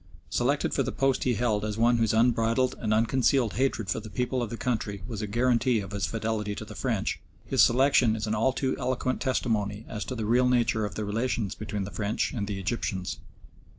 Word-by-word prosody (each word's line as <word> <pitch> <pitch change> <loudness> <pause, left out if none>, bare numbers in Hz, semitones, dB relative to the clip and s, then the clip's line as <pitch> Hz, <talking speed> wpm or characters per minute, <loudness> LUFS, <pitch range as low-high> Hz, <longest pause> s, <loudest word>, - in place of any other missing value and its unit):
Selected - - +1
for - - +1
the - - -1
post 135 -1 +1
he 125 -2 +2
held 105 -2 0
as 105 0 -3
one 120 +1 +4
whose 115 -2 +2
unbridled 115 +2 +2
and 110 - -2
unconcealed 120 +2 +2
hatred 125 -5 0
for 95 - -1
the 110 0 -9
people 125 +3 -1
of 120 - -2
the 115 - -5
country 105 -6 -2
was 110 -3 -5
a 105 - -3
guarantee 120 +2 +2
of 100 -1 -7
his 100 0 -1
fidelity 110 -2 -2
to 110 - -6
the 110 - -10
French, 110 -3 -1 0.3
his - - +2
selection 125 -2 +4
is 110 -1 -3
an 110 - -1
all 115 +5 +2
too 130 0 -1
eloquent 130 0 -1
testimony 110 -5 -1
as 105 - -4
to 130 - -5
the 110 -3 -3
real 125 +3 +3
nature 115 -3 +2
of 100 -4 -6
the 105 - -3
relations 110 -1 -1
between 105 -2 -4
the 100 - -6
French 105 +1 -1
and 105 -5 -3
the 100 -1 -3
Egyptians. 95 -2 -3
115 Hz, 220 wpm, -27 LUFS, 105-125 Hz, 0.3 s, one